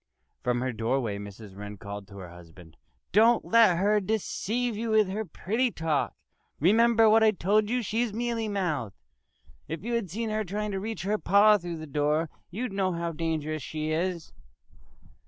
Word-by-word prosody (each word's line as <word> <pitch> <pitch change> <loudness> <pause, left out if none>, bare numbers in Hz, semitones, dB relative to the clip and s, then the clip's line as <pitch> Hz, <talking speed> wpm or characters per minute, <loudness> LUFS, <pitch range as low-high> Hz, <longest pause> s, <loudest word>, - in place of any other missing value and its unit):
From 125 0 0
her 130 -1 -2
doorway 115 -2 -1
Mrs. 100 0 -10
Wren 105 +1 -8
called 100 0 -8
to 100 0 -12
her 90 -2 -8
husband, 85 -1 -15 0.4
"Don't 225 +5 +4
let 220 -6 +5
her 205 +3 +3
deceive 220 +3 -2
you 225 +2 -3
with 215 -2 +4
her 210 +3 -2
pretty 220 +7 -1
talk! 160 -8 -1 0.4
Remember 225 +6 +5
what 220 +1 +6
I 220 - +6
told 210 +2 +1
you! 245 0 0
She's 225 +2 -1
mealy 230 0 -2
mouthed.... 160 - -2 0.7
If 165 +2 -5
you 240 +2 -3
had 230 -6 -1
seen 220 +5 -3
her 215 0 0
trying 210 +2 -3
to 195 - -2
reach 220 -1 -5
her 210 +2 0
paw 210 +1 +5
through 175 -1 -5
the 155 - -7
door 150 +2 0 0.2
you'd 215 +3 -4
know 190 -2 0
how 170 0 -2
dangerous 155 -1 -2
she 155 +3 -4
is." 170 +1 -2
185 Hz, 175 wpm, -27 LUFS, 150-220 Hz, 0.7 s, what